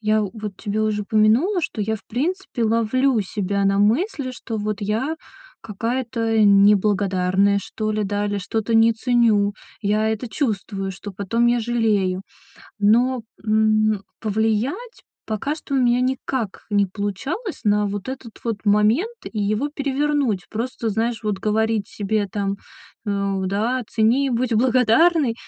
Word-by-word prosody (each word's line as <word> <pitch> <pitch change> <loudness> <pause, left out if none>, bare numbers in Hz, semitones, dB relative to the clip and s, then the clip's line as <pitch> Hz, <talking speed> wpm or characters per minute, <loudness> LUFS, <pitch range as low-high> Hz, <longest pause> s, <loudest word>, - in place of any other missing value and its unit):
я 215 0 +2
в 200 - -3
вот 210 -4 -7
тебе 215 0 -3
уже 215 -1 0
упомянула, 220 - +3
что 290 - -4
я 220 +2 -1
в - - -18
принципе 305 - -2
ловлю 230 +3 +2
себя 200 0 -2
на 195 0 +2
мысли, 255 - +1
что, 240 -2 -6
вот, 210 -1 -3
я 225 +10 -1 0.5
какая-то 230 +1 -2
неблагодарная, 200 -1 +3
что 215 -1 -4
ли, 215 0 -1
да, 205 +1 -1
или 205 0 -2
что-то 220 +4 -2
не 225 +1 +6
ценю. 225 -4 +2 0.3
Я 215 +1 +1
это 220 +3 -2
чувствую, 200 -7 -2
что 200 +2 -9
потом 205 +5 0
я 240 0 +3
жалею. 215 -5 0 0.6
Но, 240 +5 +3 0.2
м, 215 -1 +2 0.2
повлиять 225 - -1 0.3
пока 275 +8 -2
что 280 - -6
у - - +3
меня 245 -1 +3
никак 255 -4 -2
не 205 -1 +3
получалось 215 - -4
на 210 0 +3
вот 200 +2 -5
этот 260 -4 -7
вот 225 -3 -3
момент 210 - +3 0.2
и 215 - -3
его 215 +8 0
перевернуть. 280 -7 -1
Просто, 230 +1 -3
знаешь, 225 +1 -1
вот 205 -3 -1
говорить 220 -1 0
себе 205 0 -1
там, 200 -2 -2 0.5
э, 200 -1 -1
да: 225 +7 0
"Цени, 240 +5 +2
будь 240 -1 0
благодарной" 255 +4 +3
220 Hz, 145 wpm, -22 LUFS, 205-245 Hz, 0.6 s, не